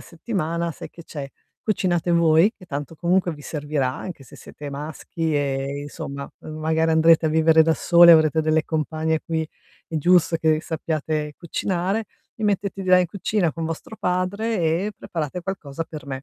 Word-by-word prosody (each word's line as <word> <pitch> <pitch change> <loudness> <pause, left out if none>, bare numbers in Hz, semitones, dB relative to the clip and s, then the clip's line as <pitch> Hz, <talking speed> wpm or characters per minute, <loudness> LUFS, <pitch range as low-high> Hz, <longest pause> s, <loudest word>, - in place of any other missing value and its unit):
settimana, 170 -2 -3
sai - - -9
che 170 - -12
c'è: 145 -4 -7 0.3
"Cucinate 175 -5 0
voi, 170 +4 +4
che 185 - -15
tanto 145 0 -5
comunque 175 +1 +1
vi 145 -1 -11
servirà 145 -4 -2
anche 175 0 -7
se 130 - -15
siete 145 -1 -9
maschi 155 +2 -4
e 140 0 -1
insomma, 140 -1 -7
ehm, 155 - -8
magari 160 +1 +1
andrete 160 0 +5
a - - +2
vivere 160 0 +5
da 160 -1 +3
soli 170 0 +7
e - - +11
avrete 160 0 +4
delle 155 0 +1
compagne 160 0 -1
qui 160 -1 -1 0.5
è 160 - -3
giusto 175 +1 +4
che 160 -1 +2
sappiate 155 -2 -3
cucinare, 185 +4 -2 0.3
vi 220 - -3
mettete 200 -1 -1
di 185 - -5
là 185 0 +7
in 180 - +1
cucina 185 -2 -1
con 165 -1 -4
vostro 165 +7 -6
padre 185 +4 -1
e 170 +6 0
preparate 165 +1 -4
qualcosa 165 -5 -4
per 155 -3 -9
me." 135 -1 -5
160 Hz, 180 wpm, -23 LUFS, 155-180 Hz, 0.5 s, e